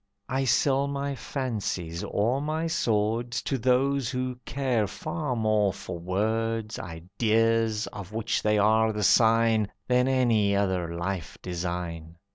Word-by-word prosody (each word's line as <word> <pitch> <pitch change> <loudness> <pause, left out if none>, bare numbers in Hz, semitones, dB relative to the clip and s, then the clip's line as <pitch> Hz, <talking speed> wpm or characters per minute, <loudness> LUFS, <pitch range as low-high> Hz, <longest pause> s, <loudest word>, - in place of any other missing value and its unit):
I 135 +1 0
sell 135 +2 +2
my 140 0 -2
fancies, 105 - -3
or 120 +7 0
my 155 +2 -1
swords, 120 -5 0
To 135 - -1
those 130 +1 +2
who 125 -1 -3
care 125 -6 0
far 155 - -3
more 110 -3 +2
for 90 -2 -7
words, 110 +4 -1
Ideas, 110 +5 0
of 100 -2 -8
which 110 +1 -1
they 105 0 +2
are 110 +2 +4
the 105 0 -2
sign, 110 0 +4 0.2
Than 125 +1 +3
any 115 -6 +3
other 90 -4 0
life 85 -1 -4
design. 85 -2 -4
110 Hz, 130 wpm, -27 LUFS, 100-125 Hz, 0.2 s, are